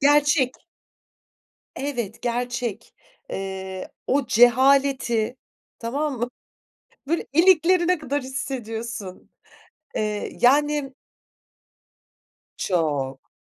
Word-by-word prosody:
gerçek! 290 -2 +4 1.2
Evet, 240 -7 -4
gerçek. 240 -2 -3 0.4
Eee, 190 -1 -5 0.2
o 275 0 +1
cehaleti, 250 -1 +4 0.4
tamam 275 +3 -2
mı? 240 +1 -1 0.8
Böyle, 335 +2 0
iliklerine 355 +1 +5
kadar 290 -2 -2
hissediyorsun. 235 -6 -5 0.7
Eee, 210 -1 -2
yani 295 +4 +4
m 270 0 -9 1.7
Çok. 145 -7 -1
250 Hz, 70 wpm, -24 LUFS, 220-285 Hz, 1.7 s, iliklerine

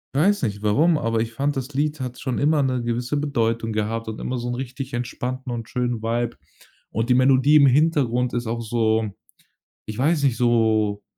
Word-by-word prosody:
weiß 195 +4 +2
nicht, 105 -2 -2
warum, 150 +11 +3
aber 115 -4 0
ich 115 +1 -2
fand, 140 +3 -1
das 135 +2 -5
Lied 150 +1 -1
hat 125 -1 -5
schon 130 -3 -2
immer 150 0 +3
'ne 130 -2 0
gewisse 120 +4 -2
Bedeutung 115 -6 -1
gehabt 110 +1 -2
und 110 - -6
immer 125 0 -3
so 120 - -4
'n 120 - -2
richtig 130 +1 -6
entspannten 125 +1 -4
und 115 -1 -5
schönen 120 -3 -2
Vibe. 115 +1 -2 0.5
Und 115 +3 -2
die - - +6
Melodie 135 +3 +5
im 140 - +6
Hintergrund 130 -4 +2
ist 120 -1 -2
auch 115 +1 -2
so- 110 -1 0 0.8
ich 110 - -5
weiß 145 +3 +1
nicht- 130 -4 +2
so 110 -4 +2
125 Hz, 195 wpm, -23 LUFS, 115-135 Hz, 0.8 s, die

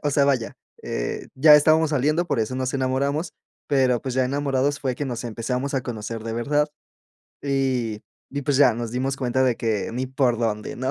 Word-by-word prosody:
o 145 - +1
sea, 140 0 +3
vaya, 130 -5 0 0.3
eh, - - -4
ya 150 +3 +7
estábamos 155 +1 +4
saliendo, 150 +5 +1
por 140 -7 0
eso 110 +4 -2
nos 130 0 -2
enamoramos, 135 +4 -1 0.4
pero, 130 -4 +2
pues, 130 -2 -3
ya 130 -1 +2
enamorados 140 +1 0
fue 130 -3 -2
que 145 - -3
nos 120 -2 -4
empezamos 125 +4 -3
a 135 - +1
conocer 115 -2 -5
de 115 - -3
verdad, 145 +5 +1 0.7
y 130 -6 -1 0.3
y 140 0 -3
pues, 140 0 +1
ya, 130 -6 +6
nos 115 0 -4
dimos 135 +2 -1
cuenta 130 0 0
de 125 -3 +2
que 110 -3 -1
ni 130 +2 -2
por 130 -3 +1
dónde, 105 -2 -2
¿no?, 130 +2 -2
130 Hz, 200 wpm, -23 LUFS, 120-140 Hz, 0.7 s, ya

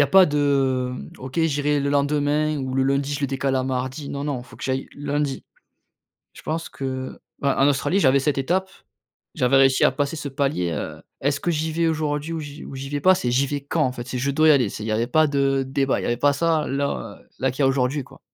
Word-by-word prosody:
a - - +5
pas 190 -1 +7
de, 135 -4 +1
mmh: - - -8
«OK, 130 +4 -6
j'irai 145 -2 +1
le 140 0 0
lendemain 145 +1 +1
ou 130 -1 -3
le 135 - +2
lundi 140 +1 0
je 145 - -3
le 140 - +1
décale 135 0 -1
à 130 - +1
mardi», 130 +2 -3
non, 140 0 -4
non 140 -4 -2
il - - -12
faut - - -14
que - - -8
j'aille 130 0 -2
lundi. 145 -1 -2 0.9
Je - - -13
pense 160 +1 -3
que, 130 -1 -5 0.2
bah 140 -1 +1
en 135 - +5
Australie 145 +7 +1
j'avais 140 -4 +4
cette 140 0 0
étape. 185 +8 0 0.7
J'avais 125 +2 +3
réussi 135 -1 +4
à - - +4
passer 140 +3 -2
ce 150 - -5
palier, 135 - -1
heu: - - -5 0.2
«Est-ce 140 +1 0
que 175 - 0
j'y 160 0 -1
vais 165 +1 +1
aujourd'hui 155 0 -1
ou 165 - -3
j'y 145 0 -8
ou - - -9
j'y 135 +1 -6
vais 145 0 -2
pas?», 185 +5 +6
c'est: 125 - -1
«J'y 135 +3 +3
vais 145 0 -3
quand?», 155 +2 0
en 130 - 0
fait, 120 -1 -7
c'est: 125 - -3
«Je 140 +2 0
dois 155 +3 +3
y - - +9
aller», 130 -7 +3
c'est 105 - -7
il 110 - -4
y - - -1
avait 115 +2 0
pas 155 +4 +3
de 135 -1 +1
débat. 135 0 0
Il - - -6
y - - -2
avait 120 0 0
pas 145 +2 +3
ça 160 +1 +1
là, 135 -6 -3
heu, - - -26
là 130 -1 +1
qu'il 130 - -4
y - - +5
a - - +5
aujourd'hui 135 +1 0
quoi. - - -17
140 Hz, 265 wpm, -23 LUFS, 130-150 Hz, 0.9 s, y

